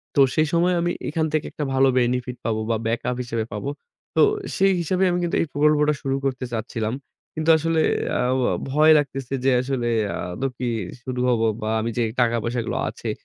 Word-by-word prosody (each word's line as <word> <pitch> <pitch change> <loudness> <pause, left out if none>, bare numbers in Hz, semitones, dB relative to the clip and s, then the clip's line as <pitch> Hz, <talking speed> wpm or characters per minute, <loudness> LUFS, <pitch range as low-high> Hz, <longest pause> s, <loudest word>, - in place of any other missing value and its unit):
তো 140 - +5
সেই 155 0 +3
সময়ে 175 +2 +3
আমি 175 - 0 0.2
এখান 160 +1 0
থেকে 155 -1 0
একটা 150 - -4
ভালো 135 0 +4
benefit 125 0 -1
পাব 115 - +1
বা 115 - +2
backup 120 +2 -1
হিসেবে 115 -2 -2
পাব। 105 - -5 0.5
তো - - +4 0.4
সেই 195 0 +4
হিসেবে 185 +3 0
আমি 175 - 0
কিন্তু 170 - -1
এই - - +1
প্রকল্পটা 150 0 +3
শুরু 135 0 -1
করতে 130 -1 -1
চাচ্ছিলাম। 110 0 -3 0.4
কিন্তু 155 +1 -2
আসলে 160 0 +1 0.4
আ - - +2 0.5
ভয় 155 +3 +5
লাগতেছে 135 -2 -2
যে 135 - +5
আসলে 130 -2 -2 0.3
আ - - -7
আদৌ 135 +9 -2
কি 125 - -2 0.4
শুরু 130 -1 -4
হব 120 -2 +2 0.2
বা 110 - -2
আমি 115 - -2
যে 120 - +2 0.2
টাকা 120 -1 +2
পয়সাগুলো 120 0 -2
আছে - - -6
135 Hz, 190 wpm, -23 LUFS, 120-155 Hz, 0.5 s, তো